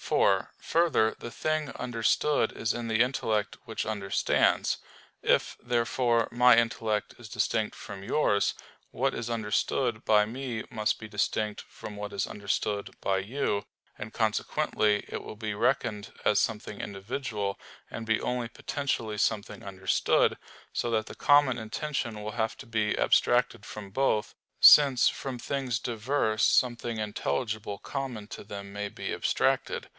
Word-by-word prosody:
4: - - +2
Further, 165 -10 +2
the 120 - -7
thing 155 +1 -1
understood 120 +5 +1
is 110 - -1
in 120 -1 -4
the 110 0 +1
intellect 110 -5 0
which 115 -2 -4
understands. 100 -3 +1 0.4
If, - - +2
therefore, 120 -1 +1
my 125 0 +6
intellect 115 -2 0
is 120 -2 -11
distinct 110 0 0
from 100 -1 -9
yours, 100 -3 +2 0.4
what 135 +2 0
is 115 0 -4
understood 115 +1 0
by 105 -1 +4
me 120 0 -4
must 110 -1 0
be 110 - -8
distinct 105 0 -1
from 105 - -10
what 105 0 -5
is 100 - -2
understood 100 0 -2
by 95 -1 +1
you; 105 0 -1 0.3
and - - -7
consequently 105 -1 +1
it - - -5
will 110 - -9
be 110 -1 -3
reckoned 105 0 0
as 105 -2 +4
something 105 -1 -3
individual, 100 0 -4 0.3
and 115 - -6
be 110 0 +2
only 125 -2 -2
potentially 115 -5 -3
something 105 -1 -1
understood; 95 -1 +1 0.4
so 120 - -1
that 110 -1 +1
the - - -10
common 145 -3 +4
intention 115 -1 -3
will 105 +1 -4
have 110 0 -2
to - - -10
be 110 -2 0
abstracted - - +2
from 100 -2 -8
both; 110 -2 0 0.2
since 140 -4 +8
from 130 -3 -3
things 130 -2 -2
diverse 115 -1 0
something 120 -2 +2
intelligible 110 0 -2
common 130 -7 -5
to 110 - -8
them 100 -1 -8
may 105 0 -3
be - - -5
abstracted. - - 0
110 Hz, 145 wpm, -28 LUFS, 105-120 Hz, 0.4 s, since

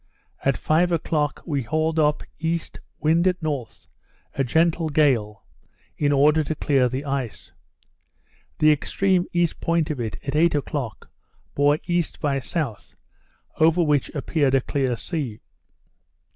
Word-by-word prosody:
At 135 -1 +2
five 170 +3 +2
o'clock 150 -3 -1
we 145 -4 -1
hauled 155 +5 0
up 150 -1 +2 0.2
east, 165 +1 -3 0.2
wind 165 +4 +2
at 180 -1 +1
north, 145 -8 -4 0.5
a 135 - 0
gentle 160 +4 +1
gale, 125 -9 +1 0.5
in 145 -1 +1
order 150 +3 +4
to 155 +2 -3
clear 135 -4 +2
the 130 +4 -4
ice. 135 -5 -4 1.1
The 155 0 +5
extreme 180 +4 +1
east 175 -2 0
point 165 -2 +1
of 145 - -4
it, 110 -3 -3
at 140 +1 -3
eight 165 +1 +3
o'clock, 140 -5 -4 0.4
bore 145 +1 +3
E. 175 0 +2 0.2
by 140 -3 0
S., 135 - -4 0.6
over 165 +2 +4
which 150 -4 +1
appeared 140 -1 +1
a 135 - +3
clear 130 -2 -1
sea. 130 -6 -4
150 Hz, 140 wpm, -23 LUFS, 135-165 Hz, 1.1 s, The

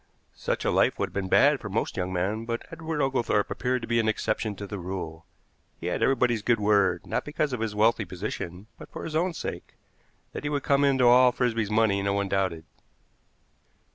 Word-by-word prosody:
Such - - -3
a - - +2
life - - +2
would - - -1
have - - -23
been 100 -1 -2
bad 145 +5 +5
for 100 - -7
most 105 +4 -2
young 90 0 -2
men, 100 +5 -1
but 115 0 -4
Edward 160 -2 -3
Oglethorpe 120 -6 0
appeared 125 -1 -1
to - - -5
be 115 0 +2
an 110 - +1
exception 110 -1 -1
to 100 - -7
the 100 0 -6
rule. 85 -3 -6 0.5
He - - -8
had 90 - -1
everybody's 125 -4 +2
good 115 +2 +2
word, 100 -4 +2
not - - -2
because 150 -1 -2
of 125 - -2
his 110 -2 -3
wealthy 110 +1 +3
position, 90 +1 -6
but - - -11
for - - -7
his 155 - -5
own 170 +1 +1
sake. - - -6 0.6
That - - -6
he 145 - -1
would 145 -2 -2
come 140 0 +3
into 135 -3 +3
all 125 +1 +7
Frisby's 115 -4 0
money 105 -2 +2
no 100 0 0
one 100 0 -1
doubted. 95 -5 -1
110 Hz, 210 wpm, -27 LUFS, 100-125 Hz, 0.6 s, all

